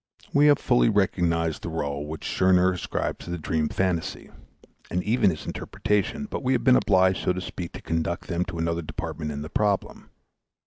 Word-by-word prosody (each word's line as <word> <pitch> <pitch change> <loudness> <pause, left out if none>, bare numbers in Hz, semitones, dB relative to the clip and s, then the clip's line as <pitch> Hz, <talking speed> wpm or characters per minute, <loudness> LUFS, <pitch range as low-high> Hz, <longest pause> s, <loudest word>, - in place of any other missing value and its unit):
We 145 +1 +5
have 145 -1 +6
fully 125 -2 +3
recognized 85 -5 +1
the 95 - -5
rôle 75 -2 -3
which 80 +1 -7
Scherner 95 0 +3
ascribes 90 - -3
to - - -9
the 90 - -2
dream 80 -1 -1
phantasy, 90 -3 -2 0.6
and 90 +1 -1
even 110 -2 +3
his 80 -4 -5
interpretation; 105 - -1
but - - -4
we 130 0 +1
have 120 -2 0
been 130 0 +6
obliged, 95 -4 +3
so - - +2
to 90 - -4
speak, 90 -1 -6
to - - -9
conduct 80 +2 -2
them 85 0 0
to 85 - -6
another 85 +1 -1
department 75 -1 -5
in 75 0 -4
the 75 - -7
problem. 105 -2 -1
90 Hz, 190 wpm, -25 LUFS, 80-100 Hz, 0.6 s, have